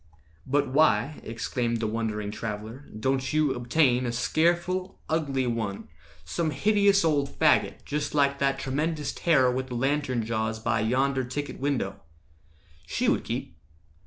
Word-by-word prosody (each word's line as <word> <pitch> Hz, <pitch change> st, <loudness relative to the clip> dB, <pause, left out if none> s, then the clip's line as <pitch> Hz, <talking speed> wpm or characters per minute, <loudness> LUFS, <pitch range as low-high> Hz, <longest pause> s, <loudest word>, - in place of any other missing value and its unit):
"But 140 Hz, +2 st, +2 dB
why," 140 Hz, -1 st, +3 dB
exclaimed 115 Hz, +1 st, -2 dB
the 110 Hz, -, -1 dB
wondering 105 Hz, -2 st, -2 dB
traveller, 110 Hz, +5 st, -6 dB
"Don't 130 Hz, +2 st, 0 dB
you 155 Hz, -2 st, +2 dB
obtain 125 Hz, 0 st, +2 dB
a -, -, -1 dB
scareful, 175 Hz, +8 st, 0 dB
ugly 140 Hz, -5 st, 0 dB
one— 110 Hz, -8 st, -3 dB, 0.4 s
Some 160 Hz, -, -1 dB
hideous 200 Hz, +5 st, +3 dB
old 145 Hz, -3 st, +2 dB
faggot, 155 Hz, +1 st, +2 dB
just 150 Hz, 0 st, -2 dB
like 140 Hz, -1 st, +2 dB
that 135 Hz, 0 st, +1 dB
Tremendous 150 Hz, +3 st, -2 dB
terror 135 Hz, -7 st, +3 dB
with 130 Hz, +1 st, -2 dB
the 125 Hz, -, -6 dB
lantern 130 Hz, -2 st, 0 dB
jaws 110 Hz, 0 st, -1 dB
By 110 Hz, 0 st, 0 dB
yonder 130 Hz, +4 st, +1 dB
ticket 130 Hz, +3 st, -5 dB
window? 140 Hz, -1 st, -2 dB, 0.9 s
She -, -, -1 dB
would -, -, +1 dB
keep." -, -, -4 dB
135 Hz, 140 wpm, -27 LUFS, 115-150 Hz, 0.9 s, why